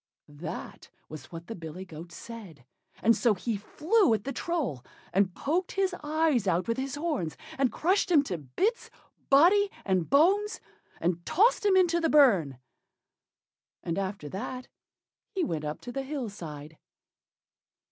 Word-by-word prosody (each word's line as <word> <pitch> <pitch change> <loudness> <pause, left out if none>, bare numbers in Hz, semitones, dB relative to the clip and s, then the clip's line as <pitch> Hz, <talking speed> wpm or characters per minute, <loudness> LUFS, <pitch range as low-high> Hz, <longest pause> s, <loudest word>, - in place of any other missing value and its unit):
That 155 +3 -8 0.2
was 155 -2 -8
what 165 0 -8
the 230 - -6
big 220 - -11
billy 185 +3 -8
goat 170 0 -10
said; 185 - -10 0.4
and 230 +1 +5
so 230 -4 +3
he 225 +4 -2
flew 315 - +2
at 210 - -5
the 275 - -4
Troll 275 - -2 0.3
and 190 -1 +2
poked 345 +6 -1
his 385 -2 +1
eyes 300 -7 +1
out 180 +2 +1
with 230 - 0
his 270 +1 -3
horns, 290 - -2 0.2
and 265 -3 +1
crushed 370 - +1
him 310 -5 +5
to 180 - -4
bits, 380 - -1 0.4
body 365 +9 +6 0.2
and 185 -4 +1
bones, 400 +9 +3 0.4
and 175 0 -1
tossed 415 - +3
him 390 - +4
out - - +8
into 340 -1 +2
the 325 - +2
burn, 195 - +5 1.3
and 170 +3 -2
after 190 -5 -4
that 250 - -5 0.7
he 375 - +1
went 160 - -2
up 150 +1 -4
to 245 - -7
the 270 - -3
hill 270 -4 -4
side. 155 -5 -9
235 Hz, 160 wpm, -28 LUFS, -, 1.3 s, out